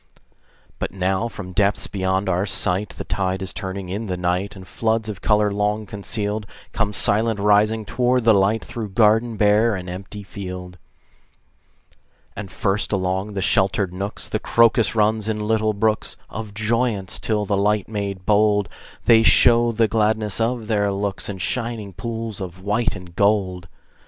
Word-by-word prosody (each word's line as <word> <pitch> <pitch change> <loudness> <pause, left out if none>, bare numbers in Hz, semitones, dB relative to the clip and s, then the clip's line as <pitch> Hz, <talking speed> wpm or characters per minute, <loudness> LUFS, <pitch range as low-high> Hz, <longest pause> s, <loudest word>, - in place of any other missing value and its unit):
But - - -2
now 95 +4 0
from 100 -5 -8
depths 100 +1 +1
beyond 95 0 -1
our 95 +2 0
sight, 95 +2 0
The - - -7
tide 95 -1 -2
is 95 - -4
turning 95 -1 -5
in 105 +5 -4
the 90 -1 -2
night, 90 +3 -1
And 95 -1 -11
floods 110 -1 -1
of 100 -4 -6
color 105 -1 +2
long 105 +1 -1
concealed 105 +1 -3 0.2
Come 105 - -1
silent 110 +1 +2
rising 105 +2 +3
toward 125 +3 +1
the 115 0 +6
light, 100 +3 +2
Through 110 -3 -5
garden 110 +1 +3
bare 105 +2 +3
and 90 -1 -6
empty 95 +3 -7
field. 90 -2 -8 1.6
And 100 -4 -7
first, 100 +3 -1
along 95 +1 -1
the 95 -2 -2
sheltered 95 0 +1
nooks, 100 +3 -5
The - - -2
crocus 115 -1 +3
runs 110 0 +1
in 110 -1 -1
little 110 -1 +1
brooks 110 0 0
Of 110 -2 -7
joyance, 110 -3 0
till 105 -2 0
by 100 - -1
light 105 +1 +1
made 100 -3 -4
bold 105 -2 +3 0.4
They 115 -1 +6
show 120 +1 +5
the 115 0 +2
gladness 110 -1 +1
of 115 0 -1
their 105 -2 +1
looks 100 0 -3
In 100 - -4
shining 115 -1 -3
pools 115 +1 -5
of 90 -1 -7
white 105 +3 0
and 90 -3 -11
gold. 95 -3 +1
105 Hz, 160 wpm, -22 LUFS, 95-110 Hz, 1.6 s, the